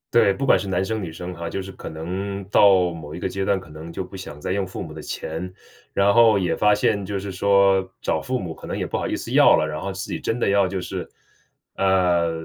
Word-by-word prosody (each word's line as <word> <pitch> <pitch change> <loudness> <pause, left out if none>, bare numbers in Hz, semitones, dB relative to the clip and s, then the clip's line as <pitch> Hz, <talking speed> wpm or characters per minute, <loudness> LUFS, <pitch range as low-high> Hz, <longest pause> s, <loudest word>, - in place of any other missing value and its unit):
对， 115 -4 +5
不 135 +8 -3
管 - - +5
是 100 - -5
男 95 0 0
生 110 +2 -2
女 90 - -4
生 90 +3 -7
哈， 85 -1 -5
就 95 - -3
是 95 +1 -8
可 95 - -10
能 95 +5 -4
到 95 -4 +5
某 80 -2 -8
一 - - -6
个 95 - -2
阶 95 +1 -3
段， 100 - +2
可 90 - -10
能 80 +2 -9
就 95 - -3
不 95 +1 -10
想 75 -5 -9
再 - - -3
用 95 0 -1
父 90 - -6
母 80 - -9
的 80 - -8
钱， 85 +4 -5 0.4
然 100 +1 +3
后 115 -3 +6
也 90 -2 0
发 105 0 +3
现 105 -1 +1
就 100 +1 -3
是 100 0 -5
说， 95 0 +3
找 - - 0
父 130 0 -2
母 90 -7 -5
可 - - -11
能 - - -3
也 - - -2
不 - - -3
好 - - -2
意 - - -1
思 - - -6
要 - - +7
了， - - +1
然 75 0 -4
后 100 - -3
自 95 - -5
己 - - -3
真 115 - -2
的 120 - +1
要 100 -1 +3
就 95 0 -3
是 - - -5 0.7
呃 90 -3 +2
95 Hz, 290 characters per minute, -23 LUFS, 85-100 Hz, 0.7 s, 要